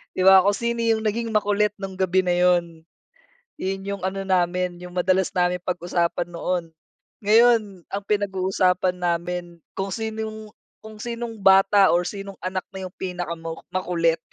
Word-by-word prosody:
'Di 185 - 0
ba 190 0 +9
kung 200 +2 +2
sino 235 +1 -2
yung 225 -1 +1
naging 230 +2 -1
makulit 210 -1 +1
nung 195 -1 -6
gabi 185 0 +2
na 180 - +2
yun. 175 -2 +2 0.7
Yun 195 +1 -3
yung 200 -1 -4
ano 190 +1 -2
namin, 180 -1 +1
yung 180 - -9
madalas 185 +1 +2
namin 180 0 0
pag-usapan 175 -1 -1
noon. 175 +1 -2 0.6
Ngayon, 215 -4 +3
ang 200 +1 -4
pinag-uusapan 190 -2 +1
namin 175 0 -3 0.2
kung 195 0 -2
sinong 220 -1 -5 0.3
kung 215 0 -11
sinong 235 -1 -5
bata 195 0 +5
or 175 +1 +3
sinong 195 +1 -6
anak 185 0 -3
na 190 0 -6
yung 180 - -18
pinakama 170 -3 -4 0.2
makulit. 170 -3 0
190 Hz, 150 wpm, -23 LUFS, 180-205 Hz, 0.7 s, ba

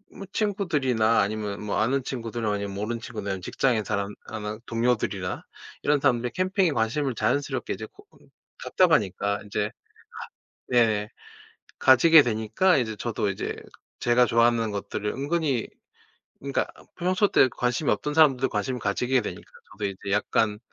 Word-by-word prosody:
뭐 195 - -8
친구들이나 145 - +1
아니면 105 0 -3
뭐 100 - -1
아는 135 +4 +1
친구들 115 -3 -4
아니면 100 -1 -2
모르는 115 +3 -3
친구들 105 -2 -6
아니면 95 -1 -4
직장에 115 +2 0
사람 100 0 -2
아나 105 -1 -5
동료들이나 115 -6 -1 0.4
이런 145 -1 +3
사람들이 125 -3 +1
캠핑에 185 -2 +1
관심을 130 +3 0
자연스럽게 130 +7 -1
이제 - - -6
고 405 0 -20 0.2
응 - - -22 0.4
답답하니까 105 - +2
인제 105 0 -2
가 - - -20 1.0
네 110 -4 +2 0.7
가지게 150 +4 +7
되니까 115 - +2
이제 110 -4 -2
저도 110 -2 -2
이제 95 - -4 0.5
제가 120 +1 +4
좋아하는 115 -1 +2
것들을 100 +1 -3
은근히 140 -3 -1 0.7
그니까 140 0 -1 0.3
평소 185 +3 +2
때 130 - +5
관심이 125 +5 -1
없던 150 0 -1
사람들도 135 -5 +4
관심을 125 +4 -2
가지게 125 +5 +1
되니까 - - -7 0.2
저도 105 - -5
이제 100 0 -5
약간 105 +1 +1
120 Hz, 355 characters per minute, -26 LUFS, 105-140 Hz, 1.0 s, 가지게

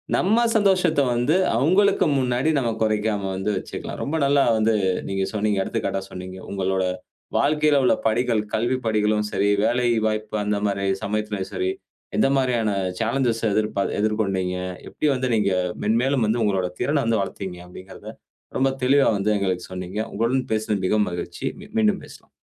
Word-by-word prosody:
நம் 185 - +1 0.3
சந்தோஷத்தை 185 -8 +3
வந்து 125 +7 +2 0.2
அவங்களுக்கு 185 - +3
முன்னாடி 125 +2 +1
நாம 120 -3 0
குறைக்காம 105 -2 0
வந்து 95 +2 -2
வச்சுக்கலாம். - - -6
ரொம்ப 145 - -2
நல்லா 140 0 +4
வந்து 110 0 +2 0.3
நீங்க 95 0 -1
சொன்னீங்க, 105 -1 0
எடுத்துக்காட்டா 95 - -2
சொன்னீங்க. 95 0 -8
உங்களுடைய 95 -1 0 0.5
வாழ்க்கையில 150 0 +3
உள்ள - - +4
படிகள், 115 0 +1
கல்வி 120 +4 0
படிகளும் 105 -1 +1
சரி, 100 - +1 0.2
வேலை 120 +2 +1 0.2
வாய்ப்பு 110 0 -2
அந்த 105 0 0
மாரி 100 -1 -1 0.2
சமயத்திலும் 105 -2 -3
சரி, 375 0 0 0.5
எந்த 210 - +4
மாதிரியான 120 -5 +1 0.3
சாலன்ஜ் 120 +2 +1 0.2
எதிர் 110 +1 +1 0.3
எதிர்கொண்டீங்க. 95 -4 0 0.3
எப்படி 150 - -1
வந்து 130 0 -1
நீங்க 100 -3 +1 0.3
மென்மேலும் 120 +4 +2
வந்து 115 +2 +1
உங்களுடைய 95 -3 0
திறனை 145 -1 +1
வந்து 115 -3 +2
வளர்த்தீங்க 95 -2 -5
அப்படிங்கிறதை 95 +1 -11 0.4
ரொம்ப 135 +1 +3
தெளிவா 135 +2 +4
வந்து 100 +2 0
எங்களுக்கு 95 -2 -1
சொன்னீங்க. 90 +2 -5
உங்களுடன் 120 +4 0
பேசினது 110 -3 -1
மிகவும் 105 +1 +2
மகிழ்ச்சி. 85 +7 -5 0.3
மீண்டும் 215 -3 +2
பேசலாம். - - -15
110 Hz, 145 wpm, -23 LUFS, 100-130 Hz, 0.5 s, நல்லா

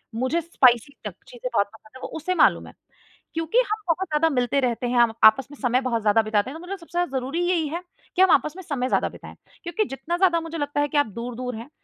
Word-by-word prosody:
मुझे 260 +8 0
स्पाइसी 260 -6 +3
तक - - -5
चीज़ें - - -6
बहुत 200 - +2
पसंद 215 -1 -18
हैं - - -15
वो - - -4
उसे 365 +4 -2
मालूम - - +3
है - - -13 0.6
क्योंकि 325 +6 -1
हम 430 0 -1
बहुत 355 +3 0
ज़्यादा 310 +1 +2
मिलते 250 -1 +1
रहते 245 -1 -1
हैं, 245 +1 0
हम 235 -2 +4
आपस 230 +4 +6
में 290 - -11
समय 250 -1 +2
बहुत 240 -3 -1
ज़्यादा 210 +1 +4
बिताते 215 +1 0
हैं। 315 - -8
तो - - -12
मतलब 390 +2 -5
सबसे 335 -3 -17
ज़्यादा 290 -7 -1
ज़रूरी 270 +6 -4
यही 335 -4 +1
है 335 +4 -4 0.3
कि 370 - +3
हम 380 - +6
आपस 305 - +3
में 375 - -8
समय 270 -6 -2
ज़्यादा - - +1
बिताएँ - - -12 0.3
क्योंकि 345 +5 -1
जितना 330 +4 -4
ज़्यादा 355 -2 +3
मुझे 330 0 -6
लगता 290 -1 -1
है 290 - +1
कि 290 - -2
आप 290 - +3
दूर-दूर 245 +1 -5
हैं 230 +5 -9
290 Hz, 255 wpm, -24 LUFS, 245-335 Hz, 0.6 s, आपस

